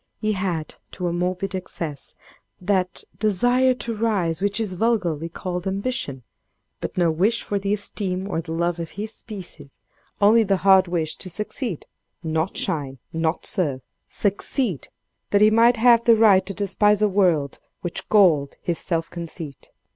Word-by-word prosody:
He 215 Hz, -1 st, 0 dB
had, 185 Hz, -6 st, -2 dB, 0.2 s
to 180 Hz, -, -4 dB
a 170 Hz, -, -1 dB
morbid 180 Hz, +2 st, -2 dB
excess, 165 Hz, -5 st, -5 dB, 0.4 s
that, 185 Hz, -1 st, 0 dB, 0.2 s
desire 245 Hz, +5 st, +3 dB
to 235 Hz, -2 st, -4 dB
rise 195 Hz, -7 st, 0 dB
which 205 Hz, +2 st, +1 dB
is 210 Hz, -4 st, -2 dB
vulgarly 175 Hz, -7 st, 0 dB
called 180 Hz, +1 st, -4 dB
ambition, 190 Hz, -, -2 dB, 0.6 s
but -, -, -6 dB
no 170 Hz, -2 st, +3 dB
wish 200 Hz, +9 st, +1 dB
for 205 Hz, -, -2 dB
the 200 Hz, 0 st, -2 dB
esteem 195 Hz, -2 st, -2 dB
or 165 Hz, -5 st, -2 dB
the 165 Hz, 0 st, -8 dB
love 170 Hz, +1 st, -1 dB
of 165 Hz, -1 st, -4 dB
his 215 Hz, +2 st, -4 dB
species; 175 Hz, -, -9 dB, 0.4 s
only 215 Hz, +3 st, +6 dB
the 195 Hz, -3 st, +2 dB
hard 190 Hz, -1 st, +6 dB
wish 165 Hz, -3 st, -2 dB
to 185 Hz, -, -6 dB
succeed—not 175 Hz, -, -4 dB
shine, 140 Hz, -4 st, -2 dB, 0.2 s
not 165 Hz, 0 st, -1 dB
serve—succeed, 185 Hz, -, -2 dB, 0.4 s
that 200 Hz, -, +3 dB
he 215 Hz, +1 st, +6 dB
might 230 Hz, +2 st, +5 dB
have 235 Hz, 0 st, +5 dB
the 230 Hz, -1 st, +7 dB
right 200 Hz, -4 st, +5 dB
to 200 Hz, -, -2 dB
despise 210 Hz, +1 st, +2 dB
a -, -, +5 dB
world 175 Hz, -8 st, +1 dB, 0.2 s
which 175 Hz, -, -4 dB
galled 170 Hz, -10 st, +4 dB
his 170 Hz, -2 st, -1 dB
self 165 Hz, -2 st, -1 dB
conceit. 165 Hz, -4 st, -8 dB
190 Hz, 155 wpm, -23 LUFS, 165-210 Hz, 0.6 s, the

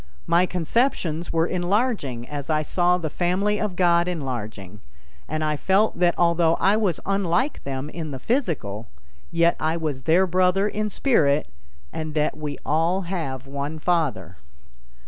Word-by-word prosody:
My 175 Hz, +2 st, +3 dB
conceptions 175 Hz, -, 0 dB
were 165 Hz, 0 st, +2 dB
enlarging 180 Hz, -, -1 dB
as 145 Hz, +1 st, -6 dB
I 155 Hz, -1 st, +1 dB
saw 175 Hz, +3 st, +2 dB
the 170 Hz, -3 st, -3 dB
family 185 Hz, +6 st, 0 dB
of 210 Hz, -4 st, -2 dB
God 175 Hz, -1 st, +3 dB
enlarging, 110 Hz, -, -5 dB, 0.5 s
and 155 Hz, +1 st, -2 dB
I 155 Hz, 0 st, 0 dB
felt 190 Hz, +5 st, +1 dB
that 175 Hz, -1 st, +3 dB
although 170 Hz, -1 st, +3 dB
I 195 Hz, +4 st, +3 dB
was 205 Hz, -7 st, 0 dB
unlike 195 Hz, -, 0 dB
them 135 Hz, 0 st, -4 dB
in 160 Hz, 0 st, -6 dB
the 135 Hz, -, -5 dB
physical, 130 Hz, -, -2 dB, 0.4 s
yet 170 Hz, 0 st, +3 dB
I 160 Hz, +2 st, 0 dB
was 150 Hz, -5 st, -3 dB
their 175 Hz, +4 st, +4 dB
brother 185 Hz, +2 st, +2 dB
in 210 Hz, 0 st, -2 dB
spirit, 155 Hz, -, +2 dB, 0.4 s
and 155 Hz, -1 st, -5 dB
that 150 Hz, -1 st, +1 dB
we 150 Hz, -2 st, -5 dB
all 165 Hz, +5 st, +1 dB
have 160 Hz, -8 st, -4 dB
one 140 Hz, +3 st, -4 dB
Father. 145 Hz, -, -1 dB
170 Hz, 150 wpm, -24 LUFS, 145-185 Hz, 0.5 s, their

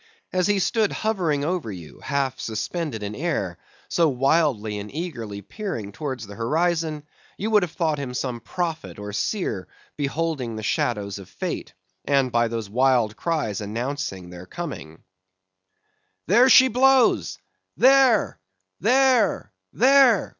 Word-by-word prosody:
As 185 Hz, 0 st, +2 dB
he 205 Hz, -1 st, +2 dB
stood 215 Hz, +2 st, +1 dB
hovering 175 Hz, -10 st, -1 dB
over 170 Hz, -9 st, -2 dB
you 85 Hz, -5 st, -10 dB
half 135 Hz, -3 st, -2 dB
suspended 115 Hz, +2 st, -3 dB
in 100 Hz, +1 st, -4 dB
air, 105 Hz, -, -2 dB, 0.3 s
so 165 Hz, -2 st, +2 dB
wildly 130 Hz, -6 st, +1 dB
and 105 Hz, +1 st, -8 dB
eagerly 115 Hz, -, -5 dB
peering 120 Hz, -, -5 dB
towards 130 Hz, 0 st, -5 dB
the 100 Hz, -, -10 dB
horizon, 155 Hz, -, 0 dB, 0.3 s
you 215 Hz, +3 st, -2 dB
would 210 Hz, -1 st, +5 dB
have 180 Hz, -4 st, -2 dB
thought 155 Hz, -3 st, 0 dB
him 125 Hz, -3 st, -5 dB
some 125 Hz, -2 st, -3 dB
prophet 165 Hz, +5 st, -4 dB
or 105 Hz, 0 st, -7 dB
seer 105 Hz, -, -2 dB, 0.3 s
beholding 145 Hz, -4 st, -2 dB
the 110 Hz, -, -6 dB
shadows 105 Hz, -4 st, -1 dB
of 95 Hz, -, -12 dB
Fate, -, -, -5 dB, 0.3 s
and 135 Hz, -3 st, +2 dB
by 120 Hz, 0 st, +2 dB
those 115 Hz, -2 st, -4 dB
wild 120 Hz, -1 st, +2 dB
cries 150 Hz, -, -2 dB
announcing 110 Hz, -4 st, -4 dB
their 90 Hz, +1 st, -10 dB
coming. 135 Hz, -, -7 dB, 1.2 s
"There 240 Hz, +8 st, +5 dB
she 260 Hz, +1 st, +8 dB
blows! 260 Hz, +1 st, +3 dB, 0.4 s
there! 260 Hz, -3 st, +4 dB, 0.4 s
there! 240 Hz, -, +3 dB, 0.2 s
there! 260 Hz, -3 st, +5 dB
140 Hz, 135 wpm, -24 LUFS, 110-180 Hz, 1.2 s, she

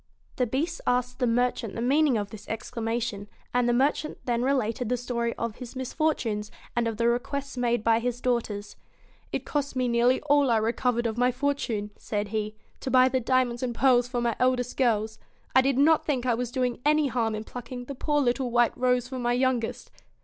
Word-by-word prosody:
The 250 Hz, -, +1 dB
Beast 305 Hz, +9 st, -2 dB
asked 250 Hz, +1 st, 0 dB
the 250 Hz, -, +2 dB
merchant 240 Hz, -2 st, 0 dB
the -, -, -4 dB
meaning 275 Hz, +1 st, +3 dB
of 205 Hz, -1 st, -3 dB
this 215 Hz, -, -11 dB
exclamation, 225 Hz, -2 st, -3 dB, 0.3 s
and 245 Hz, -1 st, +2 dB
the -, -, +4 dB
merchant 280 Hz, +5 st, +1 dB
then 240 Hz, -2 st, 0 dB
related 245 Hz, -3 st, 0 dB
the 250 Hz, -, +1 dB
story 235 Hz, -1 st, -2 dB
of 230 Hz, -2 st, -4 dB
his 250 Hz, 0 st, -9 dB
misfortunes, 255 Hz, -6 st, -1 dB, 0.3 s
and 240 Hz, -1 st, +1 dB
of 225 Hz, -2 st, -3 dB
the 235 Hz, +1 st, +2 dB
requests 265 Hz, +3 st, -1 dB
made 240 Hz, -2 st, 0 dB
by 225 Hz, 0 st, +4 dB
his 245 Hz, 0 st, -2 dB
daughters. 230 Hz, -5 st, -2 dB, 0.6 s
'It -, -, -3 dB
cost 285 Hz, -2 st, -2 dB
me 255 Hz, -1 st, +1 dB
nearly 240 Hz, +2 st, +3 dB
all 290 Hz, -2 st, +3 dB
I 230 Hz, -, +4 dB
re 220 Hz, +2 st, +1 dB
covered 245 Hz, -2 st, 0 dB
of 230 Hz, 0 st, -1 dB
my 250 Hz, 0 st, +4 dB
fortune,' 250 Hz, -6 st, -2 dB
said 205 Hz, -1 st, -3 dB
he, 215 Hz, 0 st, -3 dB, 0.2 s
'to -, -, -4 dB
buy 255 Hz, 0 st, +5 dB
the 260 Hz, 0 st, +1 dB
diamonds 250 Hz, -1 st, +1 dB
and 245 Hz, -2 st, -2 dB
pearls 245 Hz, -2 st, +4 dB
for 245 Hz, -1 st, -2 dB
my 235 Hz, -1 st, 0 dB
eldest 250 Hz, -1 st, +1 dB
girls; 220 Hz, -4 st, +1 dB, 0.4 s
I 260 Hz, -, +8 dB
did 265 Hz, 0 st, +1 dB
not 310 Hz, +3 st, +5 dB
think 260 Hz, -5 st, -1 dB
I 245 Hz, -, +3 dB
was 245 Hz, +1 st, -2 dB
doing 250 Hz, -1 st, -1 dB
any 300 Hz, 0 st, +3 dB
harm 230 Hz, -4 st, 0 dB
in 215 Hz, -, -4 dB
plucking 245 Hz, +2 st, -7 dB
the 280 Hz, -, -6 dB
poor 295 Hz, +2 st, 0 dB
little 250 Hz, 0 st, +1 dB
white 240 Hz, 0 st, +3 dB
rose 250 Hz, -1 st, +1 dB
for 260 Hz, 0 st, -5 dB
my 240 Hz, 0 st, +1 dB
youngest.' 250 Hz, -2 st, -1 dB
245 Hz, 210 wpm, -27 LUFS, 230-260 Hz, 0.6 s, I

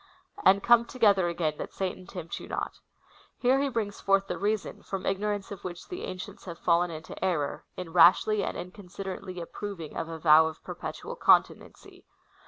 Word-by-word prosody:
And 195 Hz, +1 st, +5 dB
come 235 Hz, -1 st, +6 dB
together 205 Hz, -8 st, +3 dB
again, 165 Hz, -3 st, -1 dB
that -, -, -6 dB
Satan 185 Hz, -1 st, -4 dB
tempt 175 Hz, -4 st, -6 dB
you -, -, -10 dB
not. -, -, -4 dB, 0.6 s
Here 260 Hz, +2 st, +3 dB
he 280 Hz, -, +1 dB
brings 220 Hz, -5 st, -3 dB
forward 195 Hz, 0 st, +2 dB
the -, -, -3 dB
reason, 210 Hz, +1 st, -2 dB
from 195 Hz, -1 st, -5 dB
ignorance 205 Hz, 0 st, -1 dB
of 200 Hz, -, -8 dB
which 175 Hz, -2 st, -7 dB
the 360 Hz, -, -5 dB
ancients 185 Hz, 0 st, -8 dB
have 170 Hz, -3 st, -7 dB
fallen 175 Hz, 0 st, +2 dB
into 160 Hz, +2 st, -8 dB
error, 160 Hz, -7 st, -1 dB
in 175 Hz, -3 st, -6 dB
rashly 195 Hz, +4 st, +6 dB
and -, -, -3 dB
inconsiderately 185 Hz, 0 st, -7 dB
apjDroving 175 Hz, -1 st, -7 dB
of 165 Hz, 0 st, -3 dB
a 165 Hz, -, -5 dB
vow 160 Hz, 0 st, +6 dB
of 160 Hz, -, -8 dB
perpetual -, -, -6 dB
continency. -, -, +1 dB
185 Hz, 175 wpm, -28 LUFS, 170-205 Hz, 0.6 s, come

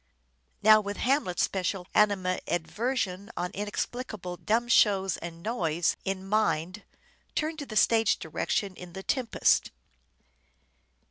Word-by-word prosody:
Now, 215 Hz, 0 st, +8 dB
with 205 Hz, 0 st, -5 dB
Hamlet's 255 Hz, -9 st, +1 dB
special 190 Hz, -1 st, -1 dB
animadversion 200 Hz, +2 st, 0 dB
on 180 Hz, +1 st, -2 dB
" -, -, -30 dB
inexplicable 205 Hz, -2 st, -4 dB
dumb 230 Hz, +6 st, 0 dB
shows 195 Hz, -5 st, +3 dB
and 170 Hz, 0 st, -8 dB
noise 175 Hz, -8 st, 0 dB
" -, -, -34 dB
in 190 Hz, 0 st, -6 dB
mind, 195 Hz, -2 st, 0 dB, 0.5 s
turn 315 Hz, +1 st, -1 dB
to 285 Hz, -3 st, -6 dB
the 215 Hz, -, -7 dB
stage 225 Hz, 0 st, +4 dB
directions 185 Hz, +4 st, -2 dB
in 180 Hz, -1 st, -10 dB
"The 190 Hz, -, -7 dB
Tempest." 250 Hz, -1 st, +2 dB
200 Hz, 125 wpm, -28 LUFS, 180-225 Hz, 0.5 s, Now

